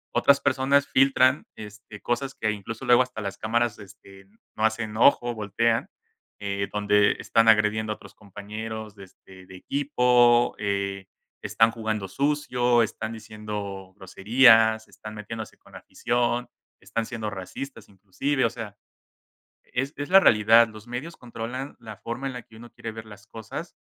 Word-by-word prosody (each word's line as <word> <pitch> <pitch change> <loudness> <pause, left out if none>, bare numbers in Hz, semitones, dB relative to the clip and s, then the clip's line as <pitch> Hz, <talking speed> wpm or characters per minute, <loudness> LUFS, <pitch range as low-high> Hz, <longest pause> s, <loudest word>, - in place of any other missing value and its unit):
otras 140 0 +4
personas 135 +2 +2
filtran, 135 +1 +3
este, 105 0 -11
cosas 130 +3 -2
que 110 - -1
incluso 110 +4 -7
luego 125 0 +5
hasta 125 -3 -8
las 100 -2 -5
cámaras, 115 0 0
este, 95 -1 -15 0.3
no 110 - +2
hacen 110 -1 -2
ojo, 120 -1 +4
voltean, 110 +2 0 0.5
eh, 100 -1 -3
donde 105 0 +3
están 115 0 +2
agrediendo 110 0 +3
a - - -11
otros - - -16
compañeros 105 +1 -8
de, 100 - -12
este, 95 0 -17
de 95 - -13
equipo, 125 0 +2
eh, 100 -1 -2 0.4
están 115 0 +3
jugando 110 -3 -3
sucio, 125 -1 +1
están 110 0 -5
diciendo 105 -3 -7
groserías, 110 +3 +4
están 110 0 -11
metiéndose 110 +1 -8
con - - -22
la - - -9
afición, 120 0 -1 0.3
están 115 -1 -3
siendo 110 -3 -5
racistas 105 +5 -8
inclusive, 105 +8 -2
o - - +2
sea, 110 -3 -8 0.9
es 135 +3 -3
es 145 - -5
la 190 - +9
realidad, 115 - +6
los 110 +1 -13
medios 135 +8 -6
controlan 120 +3 -7
la 110 -3 -10
forma 120 +4 -5
en - - -6
la 125 - -7
que 110 - -19
uno 120 +1 -13
quiere 115 - -7
ver 110 0 -9
las 105 0 -14
cosas 110 -2 -8
110 Hz, 155 wpm, -25 LUFS, 105-120 Hz, 0.9 s, la